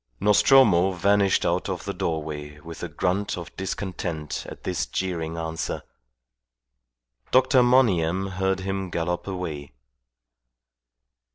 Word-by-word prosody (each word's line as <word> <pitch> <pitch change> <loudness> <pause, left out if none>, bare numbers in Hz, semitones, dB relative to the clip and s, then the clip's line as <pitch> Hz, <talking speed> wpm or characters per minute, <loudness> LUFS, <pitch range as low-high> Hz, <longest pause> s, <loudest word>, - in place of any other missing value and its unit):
Nostromo 105 -2 +5
vanished 100 +2 +2
out - - 0
of - - -4
the - - -3
doorway 75 -2 -4
with 85 -1 -9
a 90 - -3
grunt 90 +6 -1
of 85 - -8
discontent 90 -5 -4
at - - -11
this - - -2
jeering 85 -3 -3
answer. 80 0 -4 1.5
Dr. 130 0 +5
Monygham 95 -7 +3
heard 95 0 0
him 95 0 -3
gallop 85 +2 -2
away. 80 -8 -5
90 Hz, 110 wpm, -25 LUFS, 80-95 Hz, 1.5 s, Nostromo